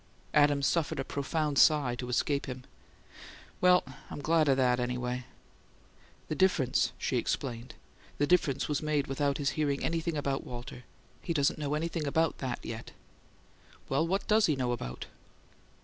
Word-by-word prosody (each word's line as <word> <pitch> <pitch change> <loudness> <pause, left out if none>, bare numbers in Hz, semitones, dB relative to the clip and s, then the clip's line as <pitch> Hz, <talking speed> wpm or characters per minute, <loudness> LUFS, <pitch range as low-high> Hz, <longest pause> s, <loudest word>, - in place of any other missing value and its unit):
Adams 145 -1 +4
suffered 160 -2 0
a - - 0
profound 145 +1 -1
sigh 145 -6 +5
to 125 0 -5
escape 140 +3 0
him. 130 -1 -6 1.0
"Well 180 0 +6 0.3
I'm - - -6
glad 155 +1 +2
of 135 - +4
that, 125 -2 +3
anyway." 125 0 -2 1.0
"The - - -2
difference," 155 -8 +2
she - - -1
explained 120 -1 -3 0.4
"the 145 - +2
difference 145 -5 +2
was 150 - -1
made 150 -2 0
without 140 +1 0
his 140 -2 0
hearing 145 -3 -1
anything 165 -1 -1
about 140 -1 -1
Walter. 120 0 -8 0.4
He 170 - -3
doesn't 145 +1 +2
know 150 0 -1
about 160 0 0
THAT 130 -3 -3
yet." 115 0 -7 1.0
"Well, 140 +5 +1
what 195 +3 -1
does 215 0 +4
he 155 - +2
know 125 -2 -1
about?" 65 - -5
140 Hz, 150 wpm, -30 LUFS, 130-155 Hz, 1.0 s, Well